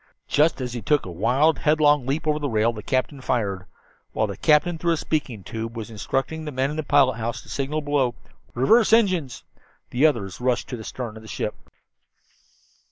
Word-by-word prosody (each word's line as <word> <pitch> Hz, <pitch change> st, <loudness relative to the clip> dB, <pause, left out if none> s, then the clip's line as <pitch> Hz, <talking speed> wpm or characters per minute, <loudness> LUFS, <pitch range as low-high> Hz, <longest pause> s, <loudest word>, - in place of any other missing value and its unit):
Just 150 Hz, +2 st, +2 dB
as 125 Hz, -1 st, -4 dB
he 120 Hz, -, -4 dB
took 145 Hz, +8 st, +1 dB
a 90 Hz, -, -6 dB
wild, 125 Hz, -, +2 dB
headlong 150 Hz, -3 st, +3 dB
leap 150 Hz, +4 st, -1 dB
over 150 Hz, -1 st, +1 dB
the 145 Hz, -1 st, -2 dB
rail 110 Hz, +1 st, +2 dB
the 105 Hz, -, -7 dB
captain 130 Hz, +3 st, -1 dB
fired. 100 Hz, -8 st, -1 dB, 0.5 s
While 110 Hz, -, +1 dB
the 100 Hz, -2 st, -5 dB
captain, 160 Hz, +2 st, +3 dB
through 170 Hz, 0 st, +1 dB
a -, -, -1 dB
speaking 140 Hz, -10 st, -3 dB
tube, 115 Hz, +2 st, -6 dB
was 115 Hz, 0 st, -6 dB
instructing 135 Hz, +8 st, -2 dB
the 150 Hz, -, -5 dB
man 135 Hz, +1 st, 0 dB
in -, -, -5 dB
the -, -, 0 dB
pilot 140 Hz, -4 st, +3 dB
house 115 Hz, 0 st, -4 dB
to 105 Hz, -, -16 dB
signal 140 Hz, +6 st, -2 dB
below 140 Hz, -4 st, 0 dB, 0.4 s
"Reverse 220 Hz, -, +4 dB
engines," 185 Hz, -, +2 dB, 0.5 s
the 135 Hz, +6 st, +4 dB
others 110 Hz, -8 st, -3 dB
rushed 125 Hz, -1 st, 0 dB
to 125 Hz, -, -4 dB
the 110 Hz, -, -8 dB
stern 115 Hz, -2 st, -6 dB
of -, -, -11 dB
the 110 Hz, -, -13 dB
ship. 105 Hz, -, -3 dB
130 Hz, 200 wpm, -24 LUFS, 115-150 Hz, 0.5 s, Reverse